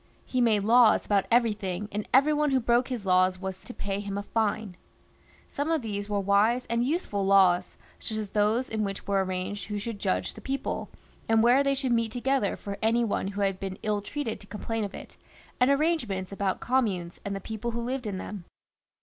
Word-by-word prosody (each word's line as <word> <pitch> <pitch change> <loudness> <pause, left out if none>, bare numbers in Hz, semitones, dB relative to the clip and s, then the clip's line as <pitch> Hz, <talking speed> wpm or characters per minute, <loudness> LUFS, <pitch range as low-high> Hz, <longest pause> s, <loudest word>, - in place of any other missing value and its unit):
He 255 - 0
made 215 -4 +3
laws 235 +2 +5
about 200 -2 +1
everything, 210 -5 +1
and 210 +1 -3
every 280 +4 +5
one 300 0 +2
who 265 -1 +3
broke 240 +1 +2
his 245 -6 -4
laws 185 0 +3
was 190 0 -5
to - - -9
pay 200 -4 -3
him 200 -1 -4
a 200 - -3
fine. 215 -3 -1 0.7
Some 290 +3 -3
of 320 -5 +1
these 205 -2 -4
were 205 -1 0
wise 205 +5 +3
and 235 0 +2
useful 255 - -1
laws, 190 -2 +4 0.3
as 215 -2 -3
those 215 +5 +1
in 220 -1 -2
which 195 -1 -4
were 195 -1 +1
arranged 185 +2 -4
who 210 0 -3
should 210 0 -5
judge 90 - -1
the - - -12
people, 270 0 -3 0.4
and 225 0 +4
where 250 +4 +5
they 275 0 +2
should 265 -2 -1
meet 230 -2 +1
together 250 -2 0
for 200 -1 -6
any 230 +2 +3
one 210 -3 -1
who 200 +1 -4
had 195 -1 0
been 190 -1 -5
ill 210 -1 0
treated 255 +1 -4
to 205 - -15
complain 225 +2 -3
of 200 - -5
it, - - -11 0.4
and 250 - +4
arrangements 275 - 0
about 200 -1 -1
communes 200 -9 0
and 200 0 -3
the - - -3
people 220 +4 -5
who 235 0 -3
lived 250 -1 -3
in 200 -2 -3
them. 190 -1 -7
210 Hz, 210 wpm, -27 LUFS, 195-240 Hz, 0.7 s, laws